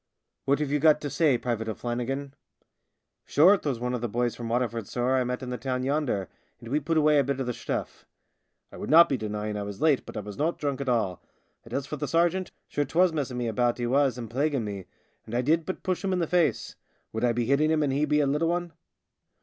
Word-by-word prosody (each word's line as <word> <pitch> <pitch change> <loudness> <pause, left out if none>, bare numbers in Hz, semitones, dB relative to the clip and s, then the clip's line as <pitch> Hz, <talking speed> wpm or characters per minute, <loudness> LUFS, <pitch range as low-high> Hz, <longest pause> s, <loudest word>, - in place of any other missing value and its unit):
" - - -56
What 140 +1 +3
have 145 -2 -2
you 150 - +2
got 155 +1 +5
to 145 - -4
say, 150 -7 +3
Private 115 -2 -3
O'Flan 120 +2 -3
nigan? 135 +3 -4 0.3
" - - -47
" - - -56
Shure, 180 +8 +6
'twas 140 - -3
one 125 +1 -2
of 125 - -2
the 120 - -2
boys 120 +1 -1
from 115 -1 -6
Water 120 +1 +1
ford, 115 -3 -6
sorr, 125 +2 0
I 130 - +2
met 125 +1 -3
in 125 - -5
the 125 - -4
town 130 -1 -2
yonder, 135 - 0 0.3
and 115 -1 -10
we 145 +4 +1
put 160 +3 -1
away 150 -1 +5
a - - +4
bit 135 0 -2
of 135 - -1
the 125 - -1
shturL - - -3 0.8
I - - -11
would - - -6
not 165 +3 +8
be 135 - +1
denying 105 -2 -3
I - - -3
was 100 0 -6
late, 155 -4 +3
but - - -7
I - - -2
was 105 -1 -9
not 160 +3 0
drunk 140 -2 -2
at 135 - -2
all. 110 -7 0 0.4
And - - -15
as 135 -1 -2
for 150 - -5
the 145 - -3
sergeant, 175 +5 +1 0.2
sure 145 - -1
'twas 170 +5 +2
messing 135 -5 -2
me 120 -1 -1
about 120 +1 +1
he 120 - -2
was 135 +1 +2
and 120 -2 -5
plaguing 135 +1 0
me, 100 -3 -5 0.4
and 115 - -5
I 125 - +1
did 160 +4 +1
but 185 - -4
push 185 0 -1
him 190 -1 0
in - - +1
the 170 - +1
face. 170 -1 0 0.4
Would 110 +2 -3
I 120 - +4
be 120 0 -1
hitting 140 +5 +3
him, 155 -1 +2
and 140 -2 0
he 150 +1 +2
a - - +2
little 150 +4 +1
one 175 -1 -2
135 Hz, 265 wpm, -27 LUFS, 120-150 Hz, 0.8 s, not